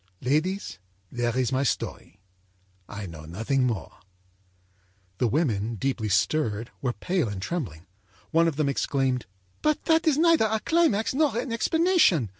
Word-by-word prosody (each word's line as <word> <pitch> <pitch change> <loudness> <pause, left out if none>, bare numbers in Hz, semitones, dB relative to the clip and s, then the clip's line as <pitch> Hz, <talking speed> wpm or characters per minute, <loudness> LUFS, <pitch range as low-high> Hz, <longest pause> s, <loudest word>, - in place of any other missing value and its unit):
âLadies, 155 +10 -1 0.3
there 120 0 -1
is 130 -1 +1
my 130 0 +1
story. 115 -6 -3 0.7
I 100 0 -6
know 80 -4 -9
nothing 115 - 0
more.â 115 -5 -5 1.2
The 125 - +3
women, 115 -5 0
deeply 115 -1 -2
stirred, 110 +2 0
were 125 -3 -1
pale 175 - -1
and 100 -2 -5
trembling. 95 - -4 0.5
One 165 +1 +4
of 160 - -1
them 150 -1 0
exclaimed: 135 -2 0 0.3
âBut 305 -1 +1
that 325 0 +2
is 295 -3 +4
neither 330 -6 +4
a 220 +1 0
climax 320 -12 +2
nor 285 -4 +2
an 245 0 -2
explanation! 320 - +3
140 Hz, 145 wpm, -26 LUFS, -, 1.2 s, One